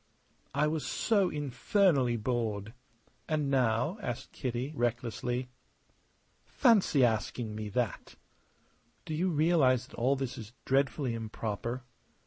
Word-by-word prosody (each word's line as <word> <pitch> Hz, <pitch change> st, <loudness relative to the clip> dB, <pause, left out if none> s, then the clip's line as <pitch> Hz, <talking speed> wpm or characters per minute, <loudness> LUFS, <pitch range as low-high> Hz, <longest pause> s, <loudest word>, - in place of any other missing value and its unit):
"I 145 Hz, +2 st, +3 dB
was 150 Hz, 0 st, -1 dB
so 200 Hz, -5 st, +2 dB
infernally 145 Hz, -, +2 dB
bored!" 110 Hz, -2 st, -2 dB, 0.6 s
"And 150 Hz, -3 st, 0 dB
now?" 125 Hz, -, +1 dB
asked 120 Hz, -, -5 dB
Kitty, 125 Hz, +3 st, -3 dB
recklessly. 120 Hz, +1 st, -1 dB, 0.9 s
"Fancy 205 Hz, -, +4 dB
asking 110 Hz, 0 st, -1 dB
me 105 Hz, 0 st, -5 dB
that!" 120 Hz, 0 st, -2 dB, 0.9 s
"Do 155 Hz, -, -4 dB
you 175 Hz, +5 st, +1 dB
realize 150 Hz, -6 st, +3 dB
that -, -, -14 dB
all 130 Hz, +4 st, +2 dB
this 130 Hz, -3 st, -4 dB
is 110 Hz, 0 st, -10 dB
dreadfully 135 Hz, -1 st, +1 dB
improper?" 115 Hz, +2 st, -4 dB
125 Hz, 110 wpm, -31 LUFS, 115-150 Hz, 0.9 s, Fancy